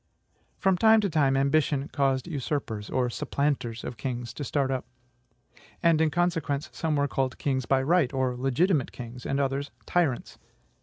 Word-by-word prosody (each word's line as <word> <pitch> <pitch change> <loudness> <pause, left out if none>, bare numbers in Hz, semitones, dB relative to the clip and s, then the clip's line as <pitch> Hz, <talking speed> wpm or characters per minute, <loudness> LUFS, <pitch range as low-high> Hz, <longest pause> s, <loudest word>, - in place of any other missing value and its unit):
From 190 -2 +2
time 220 +3 +6
to 200 -3 -1
time, 140 -3 +3
ambition 140 0 +2
caused 135 -1 0
usurpers, 135 -9 -3
or 125 -1 +1
SUPPLANTERS 120 -2 -2
of 120 - -6
kings, 120 -3 -4
to 145 - -5
start 140 -1 0
up; 130 -1 -3 1.0
and, 165 -2 +4
in 160 - +4
consequence, 165 -4 0
some 160 -2 -1
were 145 0 +2
called 135 -1 -1
kings 130 -3 -1
by 130 -1 +3
right, 160 -2 +3
or 130 -2 0
legitimate 135 +5 +1
kings, 125 +1 -8
and 135 - 0
others 140 +1 -1 0.2
TYRANTS. 160 -9 0
140 Hz, 160 wpm, -27 LUFS, 130-155 Hz, 1.0 s, time